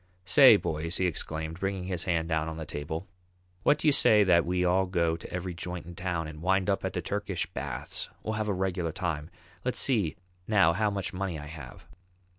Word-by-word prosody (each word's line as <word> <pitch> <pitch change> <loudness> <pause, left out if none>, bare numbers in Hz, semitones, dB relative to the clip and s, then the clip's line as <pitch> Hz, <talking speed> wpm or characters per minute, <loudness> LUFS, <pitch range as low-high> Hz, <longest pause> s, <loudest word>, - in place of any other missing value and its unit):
"Say, 130 +5 +8
boys," 85 -1 -2
he 95 - +1
exclaimed, 80 -1 -3
bringing 95 -1 -2
his 90 -2 -2
hand 80 -2 0
down 80 -1 0
on 80 - -6
the 80 - -5
table, 80 +5 -5 0.5
"what 145 +8 +4
do 155 - -1
you - - +7
say 105 -6 +5
that 85 -3 +4
we 90 0 +1
all 95 +2 +3
go 85 -3 +1
to 85 - -10
every 90 0 -3
joint 90 0 -5
in 85 - -9
town, 85 -2 -2
and 75 0 -9
wind 95 +2 +2
up 100 - -1
at - - -2
the - - -3
Turkish - - -2
baths? - - -5
We'll 110 - -2
have 110 0 -2
a - - +2
regular 90 -3 -1
time. 80 -3 -3 0.3
Let's 125 - -1
see 105 - +2 0.3
now 95 -6 +4
how 105 +4 +1
much 100 -1 -3
money 90 -3 -3
I 75 - -7
have." 75 -5 -10
90 Hz, 215 wpm, -29 LUFS, 80-95 Hz, 0.5 s, Say